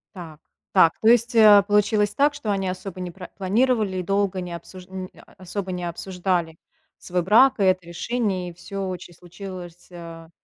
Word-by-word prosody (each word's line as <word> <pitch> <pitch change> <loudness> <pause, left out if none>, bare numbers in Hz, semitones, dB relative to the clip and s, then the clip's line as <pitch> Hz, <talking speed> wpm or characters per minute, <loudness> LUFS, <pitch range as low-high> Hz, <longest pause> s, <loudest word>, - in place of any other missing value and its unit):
Так 160 -4 -10 0.3
так. 165 - +5
То 220 - +2
есть, 235 +1 +4
э, 210 -3 +8
получилось 205 0 +2
так, 285 +4 +2
что 230 -8 -3
они 195 -1 -1
особо 185 0 -6
не 180 -1 -5
пра 180 +1 -10
не - - -17
планировали 210 0 +1
и 180 - -2
долго 195 0 0
не 175 -1 -6
обсужд 180 +2 -10
не, 185 -1 -6 0.2
а, - - -21
особо 190 0 -5
не 180 -1 -4
обсуждали 175 -1 -2 0.4
свой 180 0 -2
брак 230 +7 +5
и 200 - +2
это 185 -2 +2
решение. 185 0 -2
И - - -11
всё 195 +3 -6
очень 180 -1 -7
случилось, 175 0 -10
а, 165 -2 -10
185 Hz, 190 wpm, -23 LUFS, 175-205 Hz, 0.4 s, э